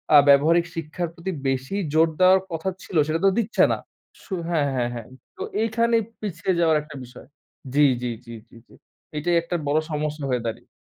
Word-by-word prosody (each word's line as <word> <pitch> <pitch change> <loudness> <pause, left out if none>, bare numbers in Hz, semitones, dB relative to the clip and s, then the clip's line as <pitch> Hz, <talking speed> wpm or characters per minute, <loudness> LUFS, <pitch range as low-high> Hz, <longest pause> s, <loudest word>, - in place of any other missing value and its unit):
আ - - +11
ব্যবহারিক 160 +5 +5
শিক্ষার 165 +2 -3
প্রতি 175 +2 -5 0.2
বেশি 135 +7 -1 0.2
জোর 160 +1 +5
দেওয়ার 185 +1 +6
কথা 165 +3 -2
ছিল 180 - -9
সেটা 160 +1 0
তো - - +7
দিচ্ছে 225 +1 +2
না। - - +1 0.5
সু 195 - -8 0.2
হ্যাঁ, 150 -4 +1
হ্যাঁ, 120 -1 0
হ্যাঁ। 115 -2 -7 0.3
তো - - -9 0.2
এইখানেই 230 0 +2 0.2
পিছিয়ে 185 -2 -2
যাওয়ার 160 -2 +4
একটা 150 -1 -12
বিষয় 125 0 -13 0.5
জি, 145 0 +5 0.2
জি, 120 -1 -2
জি, 115 - -9 0.2
জি, - - -19
জি। - - -21 0.4
এটাই 170 +3 +1
একটা 170 +1 -4
বড় 150 +2 +3
সমস্যা 150 -1 -2
হয়ে 125 -2 0
দাঁড়িয়ে 110 - -6
160 Hz, 190 wpm, -24 LUFS, 145-185 Hz, 0.5 s, আ